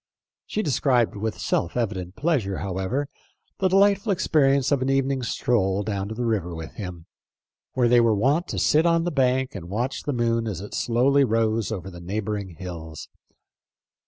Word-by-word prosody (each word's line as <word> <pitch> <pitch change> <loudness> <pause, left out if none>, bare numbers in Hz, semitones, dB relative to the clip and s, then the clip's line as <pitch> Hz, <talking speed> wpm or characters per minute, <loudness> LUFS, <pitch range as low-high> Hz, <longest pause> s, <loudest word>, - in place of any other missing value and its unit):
She 215 - -2
described 130 -6 +2
with 110 +1 -3
self 85 - -1
evident 95 -6 -2
pleasure, 135 - 0
however, 100 +9 -2 0.5
the 190 - +3
delightful 200 +2 +3
experience 140 -7 +2
of 140 -2 +2
an 130 - 0
evening's 135 -2 0
stroll 100 -4 +1
down 100 -2 -3
to 110 - -6
the 120 +1 -2
river 95 -7 -1
with 80 0 -7
him, 90 -5 -7 0.7
where 125 -2 +2
they 120 0 +5
were 115 -2 +3
wont 140 - +1
to - - -4
sit 160 +3 +3
on 165 0 +3
the 175 - -1
bank 130 -2 +1
and 85 -4 -8
watch 120 +7 -2
the 145 - -3
moon 115 -1 0
as 100 -6 -3
it 105 - -9
slowly 135 +4 +3
rose 115 -2 +1
over 95 -3 -5
the 85 -1 -10
neighboring 100 0 -4
hills. 80 -4 -8
115 Hz, 175 wpm, -24 LUFS, 95-135 Hz, 0.7 s, they